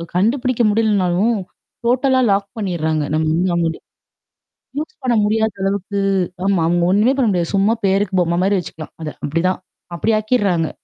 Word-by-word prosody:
கண்டுபிடிக்க 240 +5 +1
முடியலனாலும். 210 0 +2 0.5
டோட்டலா 260 +2 +3
லாக் 195 0 +1
பண்ணர்றாங்க. 160 -6 -1
நம்ம 155 0 +1
வந்து 180 +3 +1
நம்ம 170 -1 +1
வந்து 160 - -4 1.0
யூஸ் 315 +10 -4
பண்ண 245 -2 +1
முடியாத 220 0 +1
அளவுக்கு 200 +1 -2 0.5
ஆமா. 195 -4 +2
அங்க 175 0 +2
ஒண்ணுமே 215 +7 +3
பண்ண 250 -4 +2
முடியாது. 175 0 -1
சும்மா 200 +3 +3
பேருக்கு 195 -1 +1
பொம்ம 170 0 0
மாரி 200 0 +2
வச்சுக்கலாம். 155 -2 -9
அத 155 - -3 0.2
அப்டிதான். 165 +5 0 0.4
அப்டி 220 +7 0
ஆக்கிடறாங்க. 205 -8 +1
195 Hz, 150 wpm, -19 LUFS, 175-220 Hz, 1.0 s, டோட்டலா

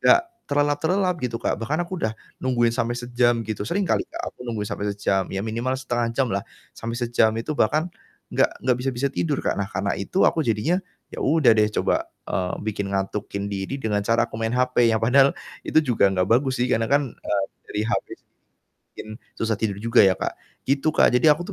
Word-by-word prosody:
nggak 350 - +6 0.3
terlelap-terelap 160 +6 +1
gitu, 125 -2 -2
Kak. 115 - -2
Bahkan 155 +9 -1
aku 180 0 -6
udah 110 - 0 0.3
nungguin 120 -3 +2
sampai 120 0 -1
sejam 120 -1 +1
gitu 110 -1 -5
sering 200 +3 0
kali - - +1 0.2
aku - - -9
nunggu 110 -3 -2
sampai 105 0 -3
sejam, 95 -2 0
ya 95 +1 -3
minimal 120 +4 -1
0,5 120 -3 -1
jam 135 -3 +2
lah 100 - 0 0.3
sampai 115 +1 -5
sejam 120 -2 +2
itu 115 +7 -3
bahkan 155 +7 +1 0.4
nggak - - +4 0.2
nggak 125 -2 +3
bisa-bisa 135 +1 -1
tidur, 150 -2 -1
Kak. - - +2
Nah 95 - -2
karena 100 0 -2
itu 140 - +1
aku 165 - +3
jadinya 150 - +1 0.3
ya - - -6
udah 155 -7 +4
deh 105 -1 +3
coba, - - +1 0.2
eee, 90 -1 -2
bikin 100 -2 -2
ngatukin 100 +1 -3
diri 95 +7 -3
dengan 110 -6 -1
cara 115 +3 +2
aku 115 -1 -8
main 115 +1 -1
HP 125 -2 +3
yang 110 - +3
padahal 135 +3 +5 0.3
itu - - +2
juga 120 -6 +3
nggak 95 -1 +1
bagus 130 +2 +2
sih 125 - +3
karena 115 0 +1
kan, 145 +1 +4
eee, 100 -1 -2 0.2
dari 105 - -2
HP 115 +1 -1
sendiri - - -43 0.6
bikin - - -8 0.3
susah 110 -1 0
tidur 100 -2 -2
juga 115 +1 +5
ya, 95 - +5
Kak, - - -2 0.3
gitu, 140 +3 +2
Kak. - - +5
Jadi 125 - +3
aku 150 +4 +1
120 Hz, 200 wpm, -24 LUFS, 110-140 Hz, 0.6 s, nggak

